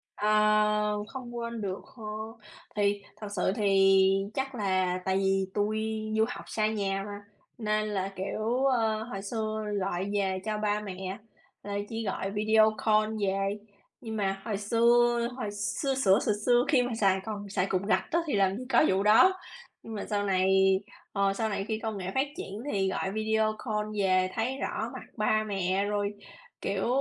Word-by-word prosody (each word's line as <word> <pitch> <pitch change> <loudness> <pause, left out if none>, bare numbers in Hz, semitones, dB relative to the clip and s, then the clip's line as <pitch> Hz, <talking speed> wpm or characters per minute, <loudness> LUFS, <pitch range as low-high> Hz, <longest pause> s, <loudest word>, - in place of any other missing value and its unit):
Ờ, 210 0 +2
không 245 -2 -7
quên 235 -1 -4
được 195 -2 -4
hơ, 225 -4 -13 0.7
thì 205 -1 +1
thật 210 - -7
sự 185 - +1
thì 195 -2 +5 0.2
chắc 270 0 -2
là 185 -4 0
tại 190 0 +1
vì 195 0 +2
tui 215 +1 0 0.4
du 220 - +4
học 250 - -7
xa 215 -1 0
nhà 200 -3 -1
mà, 205 0 -6 0.4
nên 215 -1 0
là, 195 -2 -1
kiểu, 215 +7 -1
ơ, 225 -5 +2
hồi 195 -4 -6
xưa 215 +1 -3 0.2
gọi 190 +1 -2
về 190 -2 0
cho 215 -1 -2
ba 210 0 0
mẹ, 190 -1 -6 0.4
là 200 0 -4
chỉ 225 0 -4
gọi 195 -1 -2
video 215 +1 +4
call 215 0 +3
về. 195 +1 0 0.4
Nhưng 225 -3 -5
mà 195 -2 -1
hồi 215 -3 -2
xưa 235 +3 +3
hồi 230 -6 -3
xưa 205 +7 -1
xửa 200 -7 +4
xừa 225 - +1
xưa 245 0 +5
khi 270 -5 +4
mà 245 0 -2
xài 195 -3 +2
còn 205 -2 -5
xài 190 -1 0
cục 185 -1 0
gạch 190 -2 +2
á 335 - +2
thì 295 - -1
làm 195 -1 +2
gì 250 - -6
có 270 - +5
vụ 190 +1 +2
đó, 215 - +6 0.5
nhưng 225 - -8
mà 205 - -4
sau 205 -1 +1
này, 190 -1 +2 0.6
ờ, 200 -1 +2
sau 220 +2 -1
này 200 -2 -2
khi 220 -1 -1
công 220 -2 -4
nghệ 185 0 -4
phát 265 +2 +2
triển 215 - -6
thì 195 -1 +1
gọi 190 0 -2
video 220 0 +1
call 210 -3 -1
về 185 -1 +3
thấy 245 +4 -1
rõ - - -3
mặt - - -7
ba 215 0 +2
mẹ 195 -1 0
rồi, 205 0 -1 0.5
kiểu, - - -1
210 Hz, 185 wpm, -29 LUFS, 195-220 Hz, 0.7 s, đó